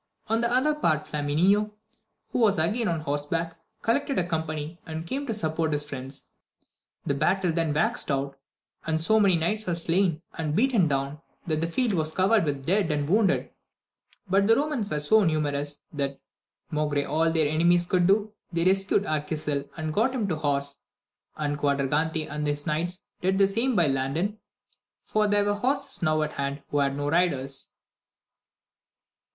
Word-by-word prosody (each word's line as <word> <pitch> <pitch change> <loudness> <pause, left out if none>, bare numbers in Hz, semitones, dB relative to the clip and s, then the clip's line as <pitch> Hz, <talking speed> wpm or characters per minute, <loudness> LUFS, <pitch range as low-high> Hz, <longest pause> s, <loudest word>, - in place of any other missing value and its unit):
On 225 +1 +2
the 235 0 +1
other 260 +5 +3
part, 155 - 0
Flamineo, 180 +9 +1 0.6
who - - -2
was 215 -4 +4
again 210 +9 +1
on 165 -2 -1
horseback, 155 +3 -2 0.3
collected 275 +4 0
a 175 - +1
company, 160 0 -3
and 160 0 -5
came 275 +10 -3
to 225 - -1
support 160 -4 -1
his 145 0 0
friends; 135 -1 -6 0.7
the 140 - +1
battle 185 +5 +1
then 165 -2 +1
waxed 220 +11 +1
hot, 140 0 -1 0.5
and 160 0 +1
so 220 +7 +3
many 195 -4 +4
knights 210 +6 -1
were 175 - 0
slain 170 -1 +1
and 155 -2 -2
beaten 225 -6 +3
down, 140 +1 -2 0.2
that 155 -2 0
the 165 - 0
field 230 +5 0
was 155 -3 -1
covered 195 +1 +3
with 145 -2 0
the 135 - -13
dead 190 +4 +1
and 145 -2 0
wounded. 200 +2 +2 0.8
But 195 +2 +3
the 225 - +6
Romans 280 -6 -1
were 150 - -1
so 210 +9 +4
numerous, 145 -3 -1
that, 140 -2 -3 0.5
maugre 150 -2 0
all 160 +3 +1
their 160 -2 +2
enemies 170 +3 +3
could 175 0 +2
do, 205 +2 +2 0.2
they 170 0 0
rescued 195 +1 +2
Arquisil 150 -3 -2
and 155 -1 -3
got 240 +8 +1
him 220 -5 -1
to 165 - 0
horse, 140 -2 -2 0.6
and 145 -1 -2
Quadragante 150 +3 0
and 150 0 -3
his 145 0 -1
knights 175 +3 -2 0.2
did 190 +1 +1
the 195 - +6
same 230 +6 0
by 175 -4 +4
Landin, 145 +10 -1 0.6
for 215 -1 +1
there 205 0 +3
were 205 - +2
horses 270 +5 -1
enow 155 -2 +2
at 150 - -4
hand 140 0 -3
who 145 - 0
had 140 -1 +1
no 145 0 -2
riders. 145 -5 0
165 Hz, 175 wpm, -26 LUFS, 145-200 Hz, 0.8 s, the